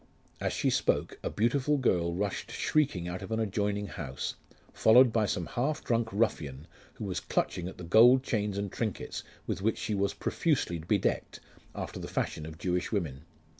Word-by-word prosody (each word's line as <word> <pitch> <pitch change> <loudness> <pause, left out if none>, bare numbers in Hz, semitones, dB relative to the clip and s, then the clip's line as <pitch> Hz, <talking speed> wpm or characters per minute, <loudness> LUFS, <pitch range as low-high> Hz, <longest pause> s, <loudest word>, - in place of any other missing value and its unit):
As - - -1
she - - +1
spoke, - - 0
a - - -2
beautiful 130 +6 +1
girl 85 -10 +1
rushed 100 +1 -2
shrieking 135 - +1
out 90 +1 -4
of - - -7
an 110 - 0
adjoining 105 -1 0
house, 70 -10 -4 0.4
followed 120 +1 +6
by 110 -2 +2
some 90 -2 -1
half 145 - -1
drunk 115 -1 +1
ruffian, 75 - -1 0.3
who - - -5
was - - -2
clutching 90 -1 -1
at 95 - -8
the 90 - -8
gold 120 +9 +7
chains 105 -5 -1
and 100 -2 -2
trinkets 110 -5 -3 0.2
with - - -3
which 110 +2 +1
she 110 - -2
was 100 0 0
profusely 135 - 0
bedecked, 90 +5 0 0.4
after - - -5
the - - -5
fashion 75 - -2
of 80 0 -9
Jewish 90 +2 -1
women. 80 - -2
100 Hz, 175 wpm, -30 LUFS, 90-115 Hz, 0.4 s, gold